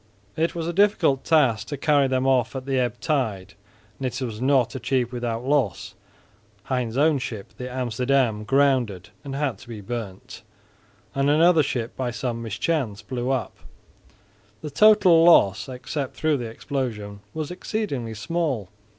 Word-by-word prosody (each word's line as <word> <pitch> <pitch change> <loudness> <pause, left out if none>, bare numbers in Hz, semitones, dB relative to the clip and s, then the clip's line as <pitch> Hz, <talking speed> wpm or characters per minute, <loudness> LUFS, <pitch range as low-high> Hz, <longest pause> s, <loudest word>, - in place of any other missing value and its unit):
It 165 +2 0
was 165 -1 -3
a 170 - -2
difficult 180 -8 +3
task 130 -9 +2
to 145 - -4
carry 145 0 +3
them 130 0 0
off 125 -2 +2
at 130 -1 -5
the 135 -1 0
ebb 125 -1 -1
tide, 105 - -1 0.5
and 135 - -1
it 125 0 -4
was 115 -4 -5
not 130 -2 +2
achieved 125 0 -1
without 120 -1 -3
loss. 135 - 0 0.7
Hein's 125 -2 -2
own 150 0 +3
ship, 110 -5 -6
the 125 0 -5
Amsterdam, 125 -2 0
grounded 125 -7 +1
and 135 -2 -6
had 140 -3 -2
to - - -14
be 115 -3 -7
burnt, 100 -2 -7 0.7
and 140 +1 +1
another 165 +2 +5
ship 120 -4 -3
by 130 -2 -2
some 120 -1 -3
mischance 115 0 -2
blew 125 -1 -3
up. 130 -6 -1 1.1
The 150 - -5
total 190 -2 +6
loss, 120 - +5
except 130 +2 -5
through 155 -2 +1
the 120 -3 -5
explosion, 110 -5 -4 0.2
was 155 0 -3
exceedingly 160 - -3
small. 135 - -2
130 Hz, 155 wpm, -24 LUFS, 115-145 Hz, 1.1 s, total